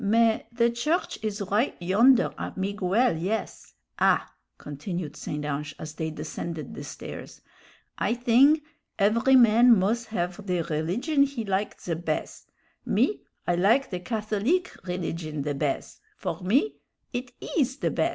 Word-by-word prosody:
"Mais, 225 +2 +3
the 235 0 +2
church 300 +10 -1
is 210 -1 -2
right 220 +7 +2
yonder 225 +9 +4
at - - -5
Miguel', 200 +3 +1
yes. 195 +6 -4 0.2
Ah!" - - +3 0.2
continued 150 +2 -5
St. 150 0 -4
Ange, 150 0 -3
as 155 0 -7
they 160 0 -3
descended 155 -1 -6
the - - -7
stairs, - - -9 0.6
"I 225 - +1
thing 260 +6 +5 0.3
every 230 +6 +4
man 235 -1 +7
muz 225 +5 0
have 180 -1 -3
the 180 -2 0
rilligion 180 - 0
he 255 -5 -5
like 195 +1 -1
the 170 - -3
bez 160 -1 -4 0.4
me, 420 - +1 0.3
I 175 - +2
like 220 +11 +3
the 180 - -2
Catholique 220 - 0 0.2
rilligion 165 -4 -3
the 145 0 -1
bez 140 -1 -2 0.2
for - - -4
me 250 - +1 0.4
it 250 +1 -4
is 270 -4 -1
the - - 0
bez. - - +1
205 Hz, 145 wpm, -26 LUFS, 170-240 Hz, 0.6 s, man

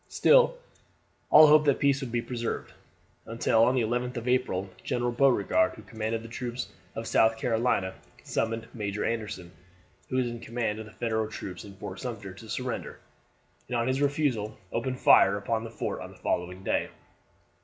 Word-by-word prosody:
Still - - +5 0.7
all 155 +1 +9
hoped 150 0 +6
that 140 -2 +4
peace 140 -1 +2
would 130 -3 -5
be 120 0 -1
preserved, 120 -2 -4 0.5
until 115 0 +2
on 125 +3 +3
the 125 - +2
11th 125 +2 -1
of 120 +1 -5
April 125 -7 +1 0.2
General 120 0 -1
Beauregard, 120 -8 +3
who 110 - -12
commanded 110 +1 -3
the - - -8
troops 120 +1 -5 0.3
of 115 - -4
South 110 0 +3
Carolina, 110 -5 0 0.3
summoned 115 0 -2
Major 105 -2 -3
Anderson, 110 -6 -3 0.6
who - - -3
was 130 -1 +2
in 120 -1 -5
command 115 -2 -3
of 110 - -7
the - - -13
Federal 110 -2 -1
troops 95 -4 -7
in 100 -1 -11
Fort 95 - -7
Sumter, 110 -7 -6
to 110 +3 -13
surrender, 125 +1 -4 0.7
and 125 - -1
on 115 +1 0
his 130 +2 0
refusal 135 -7 0
opened 130 +2 -2
fire 100 +1 +6
upon 110 +2 -2
the 115 - -6
fort 115 - -4
on - - -7
the - - -15
following 90 +2 -2
day. - - 0
115 Hz, 175 wpm, -28 LUFS, 110-125 Hz, 0.7 s, all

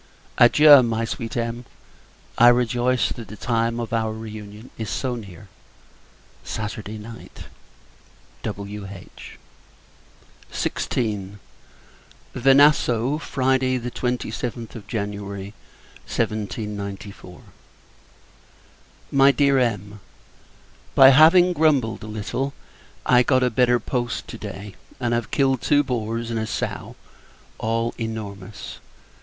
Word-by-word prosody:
Adieu! 145 +3 +8
my 115 -1 -1
sweet 115 +1 -5
Em. 115 +1 -3 0.7
I 120 - +6
rejoice 120 +1 +3
that 115 -3 -7
the 105 - -9
time 115 +1 -1
of 115 -1 -5
our 110 -1 0
re 110 0 -8
union 105 +2 -10
is 110 -3 -5
so 130 -2 -2
near 100 -5 -9 1.0
Saturday 105 0 -5
night! 115 +2 -11 1.0
W.H. 100 -2 -8 1.1
XVI. 105 -5 -2 1.0
Venasso, 135 0 +4
Friday, 130 -2 +1
27th 120 -2 -4
January 100 -2 -5 0.5
1794. 100 -3 -4 1.7
MY 135 0 +6
DEAR 140 -1 +3
EM. 105 -4 -2 1.0
By 135 0 +9
having 165 +6 +6
grumbled 145 -8 +2
a 110 - -8
little, 110 +6 -3 0.5
I 125 0 +5
got 130 0 +2
a 125 - +2
better 125 +1 +3
post 120 -2 -3
to - - -8
day; 100 +1 -8 0.3
and 120 -2 0
have 120 -1 -1
killed 135 -3 +1
two 145 0 +3
boars 115 -2 -3
and 115 - -1
a 110 - -3
sow, - - -4 0.6
all 115 +1 -1
enormous. 105 -3 -6
115 Hz, 105 wpm, -23 LUFS, 105-125 Hz, 1.7 s, By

